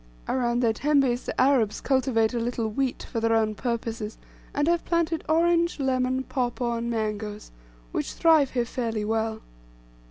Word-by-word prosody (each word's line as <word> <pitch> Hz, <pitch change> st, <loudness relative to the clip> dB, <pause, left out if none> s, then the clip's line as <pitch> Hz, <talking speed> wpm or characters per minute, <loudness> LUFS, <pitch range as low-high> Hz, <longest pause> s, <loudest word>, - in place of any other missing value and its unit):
Around 240 Hz, -1 st, 0 dB
their 230 Hz, -2 st, +3 dB
tembes 270 Hz, -1 st, +1 dB
the -, -, -3 dB
Arabs 255 Hz, -6 st, +3 dB
cultivate 255 Hz, -4 st, +1 dB
a 240 Hz, -, 0 dB
little 230 Hz, -1 st, -1 dB
wheat 255 Hz, +4 st, -2 dB
for 230 Hz, -, -4 dB
their 225 Hz, 0 st, +2 dB
own 220 Hz, -1 st, +2 dB
purposes, 230 Hz, -2 st, -3 dB, 0.3 s
and 290 Hz, +1 st, 0 dB
have 340 Hz, 0 st, +2 dB
planted 335 Hz, -1 st, 0 dB
orange, 340 Hz, +1 st, +2 dB
lemon, 260 Hz, -1 st, 0 dB
papaw, 245 Hz, -2 st, -2 dB
and 235 Hz, +1 st, -3 dB
mangoes, 215 Hz, -2 st, -3 dB, 0.4 s
which -, -, -3 dB
thrive 315 Hz, -5 st, +4 dB
here 245 Hz, -2 st, 0 dB
fairly 225 Hz, -3 st, -3 dB
well. 220 Hz, 0 st, -1 dB
240 Hz, 155 wpm, -26 LUFS, 225-275 Hz, 0.4 s, thrive